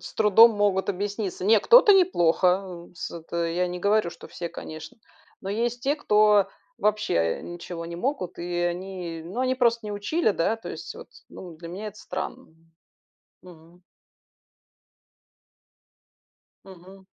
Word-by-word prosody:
с - - -10
трудом 220 +2 +7
могут 205 -2 +1
объясниться. 200 -1 -4
Не, 220 +2 +5
кто-то 470 - +7
неплохо, 180 - +2
э, - - -26
с - - -6
это 170 0 -4
я 175 +2 0
не 180 - -5
говорю, 200 -1 +1
что - - -13
все, 170 - -6
конечно. 155 +7 -9 0.4
Но 190 - -7
есть 235 +4 -2
те, 280 +3 +1
кто 210 -6 +4 0.3
вообще, 210 0 0
э, 85 -1 +1
ничего 175 -1 -7
не 170 0 -7
могут, 215 -2 -3
и 175 +1 -5
они, 175 -1 -4
ну 195 +9 -5
они 255 0 +1
просто 235 -3 +1
не 210 - -4
учили, 215 +7 0
да, 205 +3 0
то 225 - -10
есть, - - -7
вот. - - -11 0.2
Ну, 175 -4 -10
для 165 +1 -10
меня 195 +5 -7
это 210 0 -9
странно. - - -6 1.0
Мгм. 175 0 -17 2.8
Мгм. 190 +1 -15
190 Hz, 150 wpm, -25 LUFS, 175-215 Hz, 2.8 s, трудом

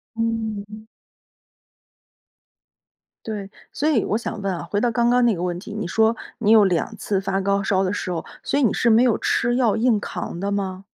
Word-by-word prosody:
嗯。 220 -2 -3 2.4
对， 205 -3 -5 0.2
所 300 - -1
以 250 -9 +2
我 215 - 0
想 225 -2 -5
问 195 -1 -1
啊， 175 - -5
回 205 - 0
到 245 - +2
刚 235 +1 +2
刚 245 0 +4
那 235 - +4
个 175 - -4
问 175 -1 -2
题， 210 +4 -9
你 210 -4 -3
说 220 +5 +2 0.2
你 215 -2 +2
有 220 -2 +7
2 180 -3 0
次 195 -2 -1
发 195 0 -1
高 200 0 0
烧 190 -1 +1
的 190 0 0
时 185 -3 -3
候， 165 - -4 0.2
所 285 - 0
以 - - +2
你 235 - +3
是 235 - +2
没 225 +1 +6
有 245 -3 +3
吃 240 +1 +1
药 240 -5 +2
硬 230 -1 +3
扛 175 -4 -5
的 200 +1 -1
吗？ 190 -2 -3
210 Hz, 215 characters per minute, -22 LUFS, 195-230 Hz, 2.4 s, 有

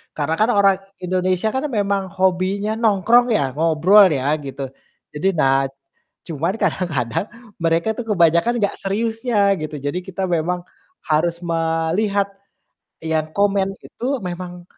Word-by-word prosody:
Karena 155 +1 -1
kan 220 +3 +3
orang 195 -1 +5 0.3
Indonesia 185 +2 0
kan 265 +2 -1
memang 200 -1 0
hobinya 190 +3 +1
nongkrong 230 +3 +4
ya, - - 0
ngobrol 165 +6 +5
ya, 130 - -3 0.2
gitu. 135 +1 -7 0.5
Jadi, 155 +6 -1
nah 135 0 +4 0.7
cuman 165 +4 -1
kadang-kadang 155 - -1 0.4
mereka 165 +4 +1
tuh 240 - -4
kebanyakan 170 +4 +3
nggak 200 - 0
seriusnya, 225 +3 -1 0.2
gitu. 155 0 -5
Jadi, 175 +6 -1
kita 190 +1 -4
memang 175 +3 -1 0.5
harus 165 +2 +2
melihat 165 +5 0 0.8
yang 160 -1 0
komen 200 -1 +2 0.2
itu 240 - -10 0.2
memang 175 0 -7
185 Hz, 125 wpm, -20 LUFS, 165-200 Hz, 0.8 s, orang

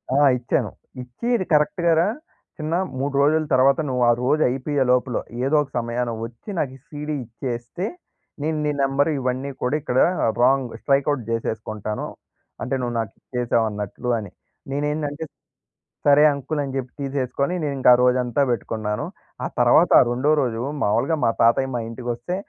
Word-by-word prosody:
ఆ! - - +3 0.2
ఇచ్చాను. 120 -1 -1 0.3
ఇచ్చి 125 - -9
"ఇది 190 - -1
కరెక్ట్‌గా 170 +3 +3
రా 170 - +3 0.5
చిన్న 155 +2 -2 0.2
3 140 +1 -2
రోజుల 155 +2 +3
తర్వాత 135 +2 +4
నువ్వు 125 -1 -1
ఆ - - +7
రోజు 150 +5 +2
అయిపోయే 135 +2 0
లోపల 125 -1 +1 0.3
ఏదోక 145 +1 +2
సమయాన 120 +1 -1 0.2
ఒచ్చి 115 - -12
నాకి 135 -5 -1
ఈ - - -24
సీడీ 150 0 -4
ఇచ్చేస్తే, 120 - -5 0.6
నేను 155 +1 0
నీ 150 - +1
నెంబర్ 135 +2 +2
ఇవన్నీ 130 +2 -2
కూడా 125 +4 +1
ఇక్కడ 130 -3 0 0.4
రాంగ్ 130 0 +3
స్ట్రైక్ 140 0 +2
అవుట్ 140 -5 -2
చేసేసుకుంటాను. 110 -2 -3 0.6
అంటే 135 - -1
నువ్వు 120 -1 -2
నాకిచ్చేసావు 115 +2 -1
అన్నట్లు 105 +4 -5
అని." 100 -4 -8 0.4
నేనేందంటే 150 +2 -2 0.8
సరే 145 0 +6
అంకల్ 145 +2 -3
అని 135 - -4
జెప్పి 130 -2 -4
తీసేసుకొని 140 +3 -1
నేను 145 -2 -1
ఇంకా 130 - +5
ఆ 120 - +2
రోజంతా 125 0 +2
బెట్టుకున్నాను. 110 -3 -2 0.4
ఆ - - 0
తర్వాత - - +5
ఆ - - +7
రెండో 130 +5 +1
రోజు 115 -3 -2 0.2
మామూలుగా 135 +10 +2
మా - - +4
తాతయ్య 120 +3 +4
మా 120 - -1
ఇంటికొస్తే 120 +6 -4
130 Hz, 155 wpm, -23 LUFS, 120-145 Hz, 0.8 s, ఆ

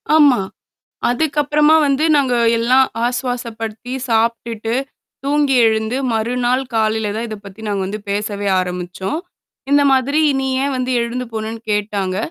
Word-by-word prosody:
ஆமா. 290 -7 +6 0.7
அதுக்கப்புறமா 295 +3 +2
வந்து 280 +2 +1
நாங்க 265 -3 +2 0.2
எல்லாம் 255 +3 +4 0.2
ஆசுவாசப்படுத்தி 240 -2 -4 0.2
சாப்பிட்டு, 230 0 0 0.5
தூங்கி 285 -1 +2
எழுந்து, 220 +2 +1 0.2
மறுநாள் 245 +3 0
காலையில 220 -1 +1
தான் 230 +2 -3
இத 215 - -5
பத்தி 200 +2 -11
நாங்க 200 -2 -1
வந்து 205 +3 -4
பேசவே 205 0 -2
ஆரம்பிச்சோம். 180 - -3 0.5
இந்த 285 0 +5
மாதிரி 270 +3 +2 0.2
நீ 265 - -1 0.2
ஏன் 280 0 -1
வந்து 255 0 -1
எழுந்து 240 +2 -3
போனேன்னு 220 +1 -4
கேட்டாங்க. 200 -3 -1
235 Hz, 125 wpm, -18 LUFS, 215-265 Hz, 0.7 s, ஆமா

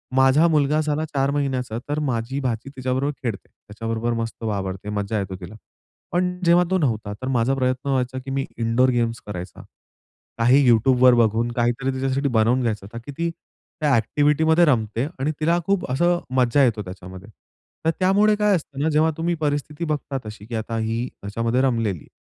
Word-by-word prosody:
माझा 135 +5 +5
मुलगा 150 -1 +2
झाला 155 +1 -1
4 135 +1 +2
महिन्याचा 130 -5 -2
तर 145 +1 0
माझी 120 +3 -2
भाची 125 -1 -3
तिच्याबरोबर 130 +2 -1
खेळते. 115 -6 -4
त्याच्याबरोबर 115 +2 -4
मस्त 115 0 -6
वावरते, 100 -2 -3
मज्जा 105 +1 -2
येतो 95 -1 -4
तिला. 90 +4 -9 0.6
पण 180 0 0
जेव्हा 170 +1 +5
तो 190 - +3
नव्हता, 110 - -1
तर 130 +5 -7
माझा 130 0 +1
प्रयत्न 130 +1 -1
व्हायचा 130 -1 0
की 135 - -5
मी 135 0 -1
इनडोअर 115 +3 +2
गेम्स 115 -2 -1
करायचा. 90 -2 -7 0.8
काही 125 +5 +5
YouTubeवर 125 +2 +5
बघून, 115 +1 +2
काहीतरी 120 +3 0
तिच्यासाठी 135 +2 -1
बनवून 120 +2 +2
घ्यायचं 110 -2 -3
की - - -6
ती 170 0 0 0.5
त्या 150 - +2
ॲक्टिव्हिटीमध्ये 150 +8 +3
रमते 115 -4 +1 0.2
आणि 145 +4 0
तिला 165 +2 +2
खूप 195 -2 +1
असं 175 +6 +2 0.2
मज्जा 125 +2 +3
येतो 115 -5 +2
त्याच्यामध्ये. 95 0 -10 0.6
तर - - +4
त्यामुळे 200 +3 +4
काय 210 -1 +3
असतं 150 -5 -6
ना, 160 - +2
जेव्हा 155 +1 +3
तुम्ही 170 +1 0
परिस्थिती 145 +2 -2
बघता 145 -3 -2
तशी, 105 -1 -9
की 115 +1 -6
आता 115 +1 -3
ही 115 +2 -1
त्याच्यामध्ये 115 +5 -1
रमलेली 115 -9 0
आहे. - - -17
130 Hz, 175 wpm, -23 LUFS, 115-145 Hz, 0.8 s, माझा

